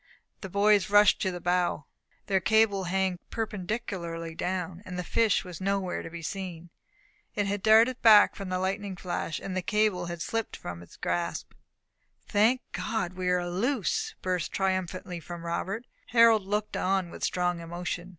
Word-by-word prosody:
The 195 - -7
boys 205 +1 +3
rushed 205 +1 +5
to 190 - +1
the 180 -1 -5
bow. 175 -4 0 0.4
Their 195 -1 +2
cable 205 -1 +3
hung 185 0 0
perpendicularly 185 -6 -4
down, 180 +1 -3
and 185 -3 -7
the 180 - -2
fish 220 +3 +2
was 180 -2 -8
nowhere 195 -1 -1
to - - -7
be 170 0 -8
seen. 175 -2 -6 0.6
It 205 - +1
had 200 0 -2
darted 225 +4 +5
back 215 -3 +7
from 195 -2 -6
the 185 - 0
lightning 195 +1 -2
flash, 175 -2 -3
and 190 -1 -5
the 185 - 0
cable 210 -3 +1
had 170 -1 -4
slipped 225 -1 -3
quietly - - -5
from 85 -1 -9
its 85 - -15
grasp. 85 0 -2 0.7
"Thank 225 +5 +3
God 220 -6 -2
we 185 0 -2
are 180 -1 +1
loose!" 255 - -1
burst 180 -3 -1
triumphantly 185 -2 -2
from 170 +1 -8
Robert. 190 +7 -3 0.2
Harold 230 -4 +5
looked 210 +1 -1
on 185 -2 0
with - - -9
strong 180 -1 0
emotion. 175 +1 -5
185 Hz, 170 wpm, -28 LUFS, 175-210 Hz, 0.7 s, back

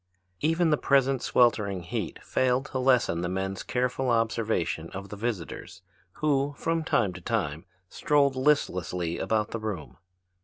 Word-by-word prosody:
Even 165 +1 +2
the 150 - +4
present 135 -2 +2
sweltering 105 -6 +2
heat 85 - -4
failed 130 +1 +1
to 135 -2 -4
lessen 125 -10 +3
the 85 - -2
men's 95 +1 -3
careful 125 +1 -1
observation 110 -8 0
of 100 +1 -7
the - - -6
visitors 105 -5 -5 0.3
who, 145 -1 0
from 165 0 -1
time 105 - +1
to 90 - -9
time, 85 -6 -2 0.2
strolled 140 +5 +2
listlessly 90 - 0
about 110 -1 0
the 115 - -3
room. 100 -9 -5
115 Hz, 145 wpm, -27 LUFS, 95-135 Hz, 0.3 s, the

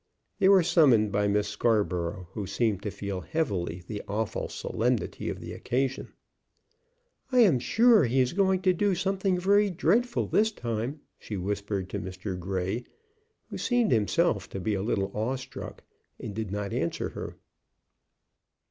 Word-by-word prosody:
They 195 -1 +5
were 195 -3 +7
summoned 125 - +4
by 105 0 +1
Miss 105 0 +1
Scarborough, 90 -7 0
who 100 -1 -5
seemed 110 -4 0
to 105 - -3
feel 100 -2 -5
heavily 90 - -2
the 105 +2 -5
awful 105 +2 -2
solemnity 120 0 -2
of - - -5
the - - -7
occasion. 135 +2 -2 1.2
"I 250 -1 +5
am 175 - +5
sure 225 - +5
he 125 +3 +1
is 125 -1 +2
going 190 -1 +2
to 185 -2 +4
do 200 +1 +1
something 190 +1 0
very 200 +3 +4
dreadful 225 +8 +1
this 220 +1 +2
time," 120 - -4 0.2
she 105 - -6
whispered 100 0 -3
to - - -2
Mr. 95 +1 -5
Grey, 95 +5 -2 0.7
who - - -5
seemed 245 - +2
himself 115 - +1
to 95 - -5
be 105 +3 -1
a 95 - -1
little 100 -2 -1
awe 110 +5 -1
struck, 130 0 -8 0.4
and 105 - -6
did 110 -1 -4
not 100 0 -3
answer 85 +1 -1
her. - - -7
115 Hz, 155 wpm, -28 LUFS, -, 1.2 s, were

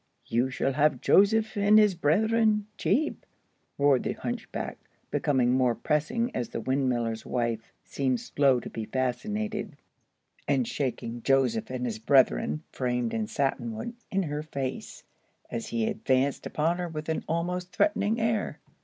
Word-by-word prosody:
"You 120 +3 +1
shall 135 +1 -1
have 150 +2 +2
'Joseph 215 +3 +4
and 205 +1 +5
his 210 -2 +6
Bretheren' 210 +6 +2
cheap," 300 +9 0 0.5
roared 140 -3 +4
the - - -2
hunchback, - - -5 0.3
becoming 130 -4 +2
more 125 -2 +3
pressing 230 - -1
as 120 - -2
the - - -4
windmiller's 120 -3 0
wife 115 -2 -2
seemed 130 -3 -1
slow 135 -3 +2
to - - -7
be 110 - -4
fascinated, 155 - -2 0.7
and 135 -4 +2
shaking 120 -4 -3
"Joseph 125 -4 +2
and 125 -1 -3
his 110 -3 -3
Brethren," 110 - +3
framed 125 -2 -1
in 220 -1 -1
satin 135 - -1
wood, 230 - -5 0.2
in 195 0 0
her 150 -2 -3
face, 140 -4 -5 0.5
as 115 -1 -4
he 115 -1 -1
advanced 130 +5 0
upon 165 +4 0
her 175 - -2
with 155 -1 -6
an 160 - -1
almost 180 +2 -2
threatening 215 0 +1
air. 225 -1 0
140 Hz, 145 wpm, -28 LUFS, 125-195 Hz, 0.7 s, his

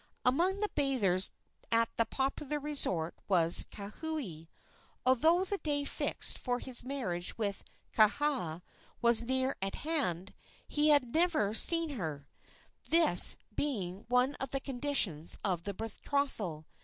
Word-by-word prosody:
Among 355 +10 +1
the 420 - 0
bathers 215 -11 +2 0.4
at 230 0 +2
that 230 -1 0
popular 275 +2 -3
resort 230 - -2
was 170 -3 +5
Kauhi. 205 - -7 0.6
Although 320 +9 +3
the 400 +1 -3
day 290 -2 0
fixed - - -1
for 245 0 -2
his 250 -1 -6
marriage 225 -10 -4
with 200 -3 -3 0.3
Kaha 215 - +1 0.4
was 235 -1 +5
near 260 +2 -1
at 195 0 -2
hand, 205 - -2 0.3
he 300 +1 +2
had 280 -5 +3
never 320 - +1
seen 330 +7 +4
her 160 - -6 0.6
this 330 0 +7 0.2
being 200 -9 -3
one 250 +3 +2
of 270 - -3
the 270 - -2
conditions 245 - -1
of 180 -4 -2
the 200 - -4
betrothal. 225 - -4
250 Hz, 130 wpm, -31 LUFS, 195-290 Hz, 0.6 s, this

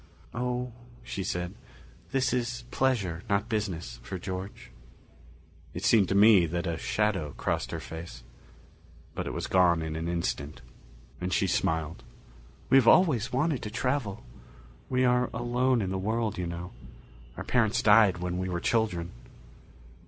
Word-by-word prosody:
"Oh," 125 +1 -2 0.3
she 95 - -4
said. 90 0 -3 0.6
"This 130 -2 +1
is 120 0 -2
pleasure, 100 -11 0
not 100 +2 +1
business, 100 -7 -3
for 95 - -6
George." 95 +2 -7 1.0
It - - -3
seemed 100 -5 +4
to 100 - +1
me 100 -4 +7
that 85 +1 -3
a 85 - -1
shadow 95 -9 0
crossed - - -1
her - - -4
face. 80 -7 -9 0.9
But - - -4
it - - -3
was - - -3
gone 85 -3 +3
in 80 -1 -4
an 80 +1 -3
instant, 85 -4 -3 0.6
and 90 +1 -2
she 95 - +2
smiled. 80 -3 -1 0.7
"We 135 - +6
have 125 -4 +4
always 130 - +5
wanted 140 +1 0
to 105 - -5
travel. 125 -2 -2 0.7
We 130 0 +2
are 125 0 +3
alone 120 0 +1
in 95 - -2
the 95 - -2
world, 110 +2 -1
you 90 -3 -3
know 85 +1 -6 0.7
our - - -4
parents 115 -2 +1
died 105 -3 +6
when 90 0 -3
we 95 0 -2
were 90 -1 -2
children." 90 -5 0
100 Hz, 150 wpm, -28 LUFS, 85-120 Hz, 1.0 s, me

